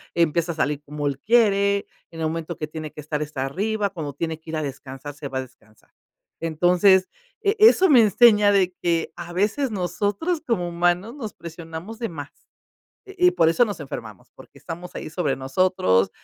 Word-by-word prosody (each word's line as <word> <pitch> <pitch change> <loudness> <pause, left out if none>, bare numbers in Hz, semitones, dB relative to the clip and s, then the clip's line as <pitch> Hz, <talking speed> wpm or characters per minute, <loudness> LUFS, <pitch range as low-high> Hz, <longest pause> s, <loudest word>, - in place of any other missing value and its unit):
empieza 170 0 +1
a - - -14
salir 145 -2 -1
como 145 0 -4
él 140 -1 -2
quiere, 200 -1 +3 0.2
en 165 - -10
el 160 - +1
momento 165 +1 -4
que 155 - -4
tiene 155 -1 -7
que 150 - -9
estar, 150 0 -3
está 140 -3 -4
arriba, 205 +7 -1
cuando 150 -6 -5
tiene 160 +2 -4
que 160 0 -10
ir 160 - -2
a - - -1
descansar, 135 +1 -7
se 145 -1 -7
va 130 -1 -3
a - - -1
descansar. 115 -4 -17 0.5
Entonces, 180 +4 +4 0.3
eh, 405 +2 +1
eso 425 -3 +7
me 260 -6 +7
enseña 210 -1 +5
de 185 -3 +2
que, 165 -2 0
a 175 0 -8
veces 210 +9 0
nosotros 205 - -1
como 180 -8 0
humanos 175 +6 0
nos 225 -7 -6
presionamos 170 +6 -9
de 230 - -2
más. 145 -3 -8 0.8
Y 370 -2 +2
y - - +5
por 165 -1 +3
eso 245 +9 +4
nos 205 -7 -5
enfermamos, 110 -8 -8
porque - - -16
estamos 175 +2 -8
ahí - - -6
sobre 155 -6 -1
nosotros, 130 - +2
170 Hz, 190 wpm, -23 LUFS, 150-205 Hz, 0.8 s, eso